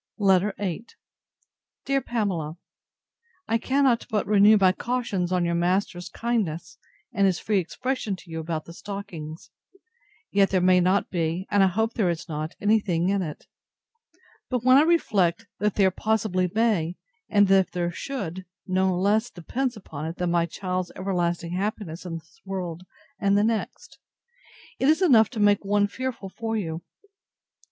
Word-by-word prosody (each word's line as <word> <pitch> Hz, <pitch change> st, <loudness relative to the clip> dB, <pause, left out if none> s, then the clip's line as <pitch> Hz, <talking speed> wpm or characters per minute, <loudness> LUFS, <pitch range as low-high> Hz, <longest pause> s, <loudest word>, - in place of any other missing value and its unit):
LETTER 195 Hz, -1 st, +3 dB
VIII 200 Hz, +3 st, -4 dB, 1.0 s
DEAR 275 Hz, 0 st, +1 dB
PAMELA, 180 Hz, -11 st, -2 dB, 0.9 s
I 230 Hz, +1 st, +1 dB
cannot 265 Hz, -2 st, +2 dB
but 215 Hz, -2 st, 0 dB
renew 210 Hz, +1 st, +6 dB
my 190 Hz, -2 st, +5 dB
cautions 200 Hz, -5 st, -2 dB
on 180 Hz, -1 st, +1 dB
your 170 Hz, -, 0 dB
master's 175 Hz, +1 st, 0 dB
kindness, 210 Hz, -9 st, -2 dB, 0.3 s
and 200 Hz, -1 st, +3 dB
his 185 Hz, -2 st, +1 dB
free 210 Hz, -2 st, +1 dB
expression 235 Hz, +3 st, -3 dB
to 180 Hz, -2 st, -15 dB
you 160 Hz, -, -4 dB
about 160 Hz, -1 st, -4 dB
the 170 Hz, -, -10 dB
stockings. 175 Hz, -5 st, -8 dB, 0.8 s
Yet 195 Hz, -1 st, +4 dB
there 190 Hz, -, +2 dB
may 180 Hz, 0 st, +5 dB
not 185 Hz, +3 st, +1 dB
be, 170 Hz, +1 st, -1 dB
and 205 Hz, -1 st, +4 dB
I 195 Hz, -, +6 dB
hope 220 Hz, +5 st, 0 dB
there 200 Hz, -6 st, +1 dB
is 170 Hz, +1 st, -3 dB
not, 155 Hz, 0 st, -4 dB
any 215 Hz, +2 st, +3 dB
thing 175 Hz, -3 st, 0 dB
in 200 Hz, 0 st, +1 dB
it. 155 Hz, -5 st, -6 dB, 1.0 s
But 250 Hz, -3 st, -1 dB
when 255 Hz, +1 st, +7 dB
I -, -, +7 dB
reflect, 225 Hz, -, +2 dB
that 210 Hz, -1 st, 0 dB
there 190 Hz, -2 st, +4 dB
possibly 200 Hz, -3 st, 0 dB
may, 205 Hz, -7 st, +1 dB, 0.3 s
and 205 Hz, -1 st, +4 dB
that 195 Hz, -1 st, +5 dB
if -, -, -37 dB
there 175 Hz, -1 st, -1 dB
should, 190 Hz, -5 st, -5 dB, 0.2 s
no 185 Hz, -1 st, +1 dB
less 210 Hz, +5 st, +2 dB
depends 245 Hz, -, -3 dB
upon 155 Hz, -6 st, -7 dB
it 165 Hz, -, -5 dB
than 180 Hz, -1 st, -1 dB
my 170 Hz, -1 st, +2 dB
child's 185 Hz, 0 st, -3 dB
everlasting 175 Hz, -3 st, -1 dB
happiness 185 Hz, -3 st, -3 dB
in 165 Hz, -, -4 dB
this 165 Hz, 0 st, -17 dB
world 185 Hz, -2 st, -5 dB, 0.3 s
and 200 Hz, -1 st, +3 dB
the 205 Hz, -, +3 dB
next; 225 Hz, 0 st, -3 dB, 0.8 s
it 265 Hz, -, +3 dB
is 315 Hz, +5 st, +3 dB
enough 230 Hz, -, +6 dB
to 235 Hz, -, -6 dB
make 205 Hz, 0 st, +4 dB
one 205 Hz, +1 st, +2 dB
fearful 235 Hz, -2 st, -5 dB
for 225 Hz, -1 st, -2 dB
you. 165 Hz, -5 st, -3 dB
195 Hz, 165 wpm, -25 LUFS, 175-220 Hz, 1.0 s, when